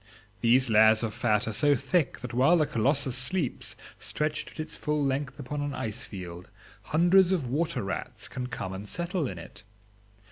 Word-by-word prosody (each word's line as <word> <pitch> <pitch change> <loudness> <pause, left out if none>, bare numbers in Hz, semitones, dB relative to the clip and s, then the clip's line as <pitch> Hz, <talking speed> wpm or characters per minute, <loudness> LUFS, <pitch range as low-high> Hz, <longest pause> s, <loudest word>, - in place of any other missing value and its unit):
These 125 +3 +4
layers 110 +1 +6
of 110 -2 -2
fat 105 -3 +1
are 110 - -2
so 145 +6 +4
thick 165 +4 0
that 125 0 -6
while 135 +8 +5
the 155 - +3
colossus 140 0 +2
sleeps, 135 +3 -1 0.2
stretched 150 0 -2
at - - -15
its 155 - -5
full 150 -1 -1
length 135 0 -2
upon 145 +1 -4
an 145 0 -3
icefield, 95 -7 -6 0.4
hundreds 175 +3 +4
of 175 -8 +1
water 145 +1 -1
rats 95 -1 -4
can 125 -1 -5
come 95 -7 -5
and 100 +2 -7
settle 175 -3 -2
in 95 - -6
it. 100 +4 -11
130 Hz, 175 wpm, -28 LUFS, 110-150 Hz, 0.4 s, layers